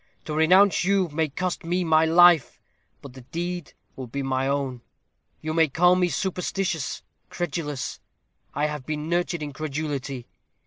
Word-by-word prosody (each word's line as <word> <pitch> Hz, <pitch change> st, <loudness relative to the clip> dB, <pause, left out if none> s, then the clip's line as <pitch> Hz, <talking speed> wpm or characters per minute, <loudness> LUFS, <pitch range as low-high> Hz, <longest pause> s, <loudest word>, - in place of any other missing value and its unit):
To 155 Hz, -, -4 dB
renounce 180 Hz, +6 st, +5 dB
you 190 Hz, -1 st, +2 dB
may 155 Hz, +1 st, -1 dB
cost 180 Hz, +5 st, -3 dB
me 175 Hz, +2 st, 0 dB
my 160 Hz, -1 st, +4 dB
life; 170 Hz, -3 st, +5 dB, 0.4 s
but 140 Hz, -3 st, -10 dB
the 130 Hz, -, -11 dB
deed 175 Hz, +5 st, -5 dB, 0.2 s
will 130 Hz, -2 st, -7 dB
be 140 Hz, +4 st, -4 dB
my 135 Hz, 0 st, 0 dB
own. 135 Hz, -3 st, -2 dB, 0.6 s
You 155 Hz, 0 st, -3 dB
may 160 Hz, 0 st, +4 dB
call 175 Hz, +5 st, +4 dB
me 180 Hz, -1 st, +2 dB
superstitious, 180 Hz, -2 st, -2 dB, 0.3 s
credulous: 150 Hz, -5 st, -4 dB, 0.6 s
I 145 Hz, +2 st, +1 dB
have 150 Hz, -2 st, -3 dB
been 150 Hz, +1 st, -4 dB
nurtured 175 Hz, -2 st, -1 dB
in 145 Hz, -1 st, -6 dB
credulity. 140 Hz, -3 st, -4 dB
155 Hz, 150 wpm, -25 LUFS, 140-175 Hz, 0.6 s, renounce